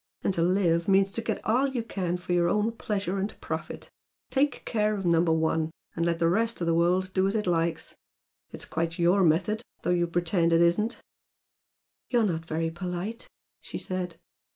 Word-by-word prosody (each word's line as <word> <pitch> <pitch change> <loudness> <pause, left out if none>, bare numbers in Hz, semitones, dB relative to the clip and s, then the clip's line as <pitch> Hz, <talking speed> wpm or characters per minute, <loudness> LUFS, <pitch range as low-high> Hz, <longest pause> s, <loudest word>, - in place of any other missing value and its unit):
And 195 - +1
to 170 - 0
'live' 170 -2 +2
means 195 0 +4
to 230 - 0
get 220 -2 -3
all 250 +6 +3
you 255 -4 -2
can 180 -6 -2
for 180 0 -3
your 175 -1 +3
own 210 +4 +1
pleasure 200 -4 -2
and 200 +2 -4
profit, - - -6 0.4
take 285 +1 +1
care 215 -2 +1
of 195 -2 -4
Number 170 -1 +3
One! 160 0 +1 0.3
and 165 - -1
let 170 -1 +1
the 165 0 +2
rest 225 +6 +1
of 175 - -1
the 165 - +2
world 180 +3 +2
do 190 0 +2
as 195 - -1
it 210 - 0
likes. 170 -2 -1 0.6
It's - - -6
quite 165 +1 -2
YOUR 175 +3 +3
method, 185 +7 +2 0.2
though - - +1
you 175 -1 +2
pretend 170 0 +1
it 165 - +5
isn't!" 195 +7 +2 1.1
"You're 240 -2 +3
not 165 -4 -2
very 165 +1 -1
polite!" 180 +6 -5 0.3
she - - -7
said. 180 -2 -4
180 Hz, 190 wpm, -27 LUFS, 170-210 Hz, 1.1 s, it